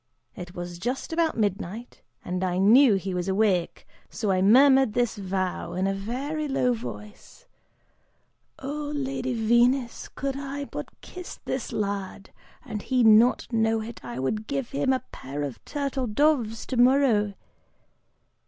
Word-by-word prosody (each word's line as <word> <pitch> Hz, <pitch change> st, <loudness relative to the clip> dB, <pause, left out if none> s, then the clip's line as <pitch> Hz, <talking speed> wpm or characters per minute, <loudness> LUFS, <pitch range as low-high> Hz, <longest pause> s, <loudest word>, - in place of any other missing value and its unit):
It 180 Hz, +1 st, -9 dB
was 175 Hz, 0 st, -6 dB
just 250 Hz, -, -3 dB
about 325 Hz, -4 st, +1 dB
midnight, 210 Hz, +2 st, -3 dB, 0.2 s
and 180 Hz, +1 st, -2 dB
I 180 Hz, -1 st, 0 dB
knew 220 Hz, +4 st, +6 dB
he 190 Hz, 0 st, -3 dB
was 180 Hz, 0 st, -2 dB
awake, 190 Hz, -3 st, 0 dB, 0.2 s
so 215 Hz, -3 st, -2 dB
I 185 Hz, -1 st, +2 dB
murmured 265 Hz, +3 st, +6 dB
this 240 Hz, 0 st, 0 dB
vow, 190 Hz, -2 st, -3 dB
in 185 Hz, +1 st, -1 dB
a 195 Hz, -, +1 dB
very 270 Hz, +10 st, -3 dB
low 250 Hz, -3 st, +1 dB
voice, 210 Hz, -2 st, -9 dB, 1.1 s
'Oh 290 Hz, +2 st, -5 dB
Lady 265 Hz, -2 st, -2 dB
Venus, 235 Hz, +2 st, +2 dB
could 275 Hz, 0 st, -4 dB
I 280 Hz, +1 st, -5 dB
but -, -, -7 dB
kiss 360 Hz, -1 st, -9 dB
this 260 Hz, -, -3 dB
lad, 200 Hz, -1 st, -4 dB, 0.3 s
and 215 Hz, -5 st, -5 dB
he 255 Hz, +1 st, +1 dB
not 225 Hz, +3 st, +5 dB
know 225 Hz, 0 st, +2 dB
it, 230 Hz, +1 st, -9 dB
I 120 Hz, -1 st, -7 dB
would 215 Hz, +12 st, -2 dB
give 275 Hz, -3 st, -3 dB
him 275 Hz, -1 st, +1 dB
a 260 Hz, -1 st, 0 dB
pair 140 Hz, +3 st, -6 dB
of 140 Hz, -4 st, -6 dB
turtle 275 Hz, -3 st, -2 dB
doves 230 Hz, -2 st, +1 dB
tomorrow! 245 Hz, -5 st, +3 dB
225 Hz, 145 wpm, -26 LUFS, 195-270 Hz, 1.1 s, knew